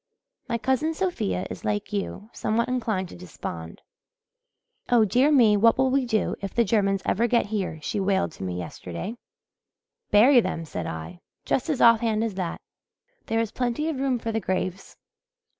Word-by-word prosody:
My 235 - +1
cousin 265 +7 0
Sophia 95 - -1
is, - - -8
like 105 - -2
you, 205 +2 -4
somewhat 230 +2 0
inclined 225 -7 -1
to - - -10
despond. 85 - -8 1.1
'Oh, 235 -3 +5
dear 255 +9 +3
me, 235 -7 +6
what 225 +2 +4
will 260 0 +2
we 265 -1 +1
do 220 -2 0
if 195 -1 -5
the 235 - +4
Germans 195 -2 +1
ever 230 +5 +2
get 235 0 +2
here,' 200 -6 -3
she 220 -4 -2
wailed 190 -2 +1
to - - -9
me 90 -1 -3
yesterday. 90 - -6 0.9
'Bury 240 +5 +6
them,' 165 -6 -3
said 85 - -5
I, 80 - -7 0.3
just 265 - 0
as 290 -4 0
off 230 -1 +7
hand 220 -1 0
as 225 -3 -2
that. 185 -3 -3 0.7
'There 225 0 +1
is 225 -2 -3
plenty 250 +5 -1
of 295 -5 -3
room 265 -2 +1
for 230 -1 -4
the 225 - 0
graves.' 185 -1 -3
220 Hz, 175 wpm, -25 LUFS, 185-245 Hz, 1.1 s, off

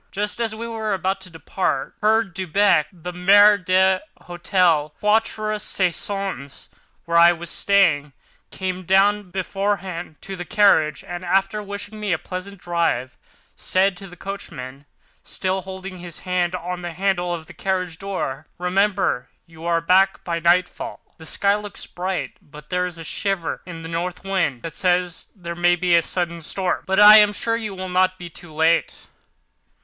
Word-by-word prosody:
Just 210 +3 -2
as 225 -2 -1
we 230 +1 -5
were 220 -3 -2
about 190 +1 -2
to 185 - -8
depart, 160 -4 -2
Herr 220 +1 +4
Delbrück 190 -3 +2
(the 180 0 -8
maître 200 +2 +6
d'hôtel 185 -3 +1
of 155 - -18
the - - -40
Quatre 215 0 +1
Saisons, 190 -6 -2 0.4
where 170 0 +1
I 170 +1 +8
was 170 0 -5
staying) 170 -8 +3 0.4
came 185 -1 -4
down, 195 +2 +3
bareheaded, 190 -3 -3
to 195 - -6
the 175 - -5
carriage 165 -6 +3
and, 175 0 -7
after 195 +3 +1
wishing 205 +1 -7
me 210 -3 -1
a - - +1
pleasant 185 +3 -7
drive, 170 -8 -1 0.4
said 190 +1 +1
to 195 - -9
the 180 - -12
coachman, 140 -8 -8 0.3
still 190 0 -2
holding 190 0 -8
his 175 -2 -8
hand 180 -1 0
on 180 0 -5
the 175 -1 -5
handle 180 -1 0
of 165 -2 -4
the - - -13
carriage 185 -4 -2
door: 170 -8 -4
"Remember 185 -6 0 0.2
you 165 -1 -10
are 170 -1 +2
back 190 +3 +3
by 170 -1 -2
nightfall. 175 +2 +1 0.2
The 160 - -9
sky 200 +5 +2
looks 210 -1 -6
bright 185 +1 -4
but 150 0 -15
there 180 0 +1
is 175 -2 -8
a 165 - -8
shiver 190 +1 -2
in 165 -2 -8
the - - -6
north 170 +2 -4
wind 180 -10 -1
that 165 -1 -6
says 180 -2 0
there 170 -3 -6
may 175 +1 +3
be 175 0 +1
a 170 - +5
sudden 170 0 -2
storm. 180 +3 -2
But 190 +1 +2
I 210 +1 +10
am 210 -1 +5
sure 230 +2 -1
you 215 -4 -4
will 185 0 -5
not 185 0 +2
be 175 -2 -9
late." 160 +1 0
185 Hz, 170 wpm, -22 LUFS, 170-195 Hz, 0.4 s, I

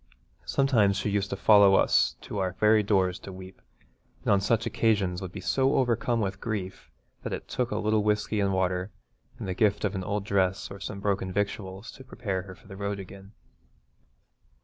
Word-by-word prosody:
Sometimes 115 -8 +3
she 100 +1 -1
used 100 -1 0
to - - -2
follow 100 -1 +6
us - - +3
to 105 - -5
our 95 -1 -1
very 105 +3 +4
doors 95 -3 +1
to - - -9
weep, 95 0 -11 0.6
and - - +1
on 100 -1 +4
such 115 +3 +1
occasions 100 -5 +1
would 95 -2 -6
be 100 - -7
so 130 +10 +1
overcome 120 -2 +1
with 95 -2 -3
grief 100 -5 -5 0.3
that - - -5
it - - -6
took 125 -2 -2
a 105 - -2
little 110 0 +1
whisky 105 0 0
and 100 -1 +1
water 90 0 0 0.5
and - - -6
the 95 - -1
gift 105 +1 +1
of 100 - -1
an 95 -2 -3
old 100 +1 -2
dress 95 -2 0
or 100 - -8
some 100 0 -6
broken 100 -2 -1
victuals 100 +1 -3
to 130 - -13
prepare 105 -7 -4
her 95 0 -11
for - - -21
the 95 - -10
road 100 0 -3
again. 95 +1 -11
100 Hz, 195 wpm, -27 LUFS, 95-105 Hz, 0.6 s, follow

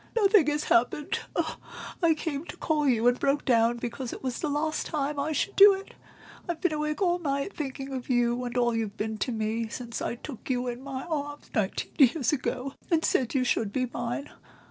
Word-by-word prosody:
"Nothing 405 -7 +5
has 295 0 +1
happened; 250 +5 +1 0.8
I 330 -2 +4
came 305 -2 -3
to - - -9
call 300 -3 +1
you, 235 -1 +3
and 245 0 +3
broke 280 +1 +1
down 235 -1 +3
because 235 +1 -4
it - - -8
was 255 -2 -2
the 305 - -1
last 310 +2 -1
time 295 -2 -2
I 290 +3 -1
should 400 +6 -1
do 400 0 +9
it. 390 +1 -10 0.6
I've 340 -2 -2
been 335 -2 +1
awake 305 +4 -1
all 355 -1 +2
night, 280 +2 -2
thinking 270 -2 -5
of 255 0 -5
you 240 0 +2
and 245 0 -4
all 240 -1 +3
you've 220 -2 -2
been 220 0 -3
to 250 - -1
me 220 0 -1
since 235 +1 -6
I - - -2
took 255 +1 -9
you 250 -1 0
in 245 +1 -4
my 270 -1 -5
arms 290 -3 -4
nineteen 210 -6 -1
years 275 0 +4
ago, 270 -1 -2 0.2
and 330 -2 +2
said 255 +1 +1
you 260 - +3
should 225 -4 0
be 255 +3 0
mine. 240 +5 -3
270 Hz, 210 wpm, -28 LUFS, 240-305 Hz, 0.8 s, do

